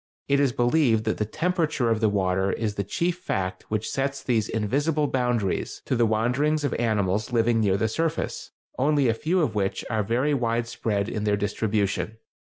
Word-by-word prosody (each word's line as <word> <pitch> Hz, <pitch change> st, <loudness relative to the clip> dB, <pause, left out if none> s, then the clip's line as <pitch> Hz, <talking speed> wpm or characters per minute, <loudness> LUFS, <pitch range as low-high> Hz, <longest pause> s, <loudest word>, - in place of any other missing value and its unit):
It 140 Hz, 0 st, +3 dB
is 140 Hz, -3 st, +3 dB
believed 120 Hz, -2 st, +2 dB
that 110 Hz, -, -1 dB
the 105 Hz, -, +1 dB
temperature 155 Hz, -, 0 dB
of 110 Hz, -, +1 dB
the 110 Hz, -1 st, +3 dB
water 95 Hz, -1 st, +1 dB
is 110 Hz, -2 st, -2 dB
the 100 Hz, -, -2 dB
chief 170 Hz, -, -1 dB
fact 95 Hz, -, -3 dB
which 110 Hz, 0 st, -1 dB
sets 135 Hz, 0 st, -2 dB
these 115 Hz, -4 st, 0 dB
invisible 145 Hz, +8 st, 0 dB
boundaries 125 Hz, -8 st, -1 dB
to -, -, 0 dB
the 120 Hz, -1 st, +3 dB
wanderings 125 Hz, +8 st, +1 dB
of 140 Hz, -, 0 dB
animals 105 Hz, -1 st, 0 dB
living 115 Hz, -1 st, +2 dB
near 100 Hz, -3 st, +2 dB
the 110 Hz, -, +1 dB
surface, 160 Hz, +8 st, -2 dB, 0.3 s
only 140 Hz, -1 st, +3 dB
a -, -, +3 dB
few 165 Hz, +10 st, 0 dB
of 125 Hz, -9 st, 0 dB
which 100 Hz, -2 st, -1 dB
are 110 Hz, -1 st, +1 dB
very 125 Hz, +8 st, +1 dB
wide 120 Hz, -3 st, 0 dB
spread 105 Hz, -3 st, -1 dB
in 105 Hz, -2 st, -3 dB
their 105 Hz, -1 st, +2 dB
distribution. 105 Hz, +1 st, -1 dB
115 Hz, 190 wpm, -25 LUFS, 105-140 Hz, 0.3 s, It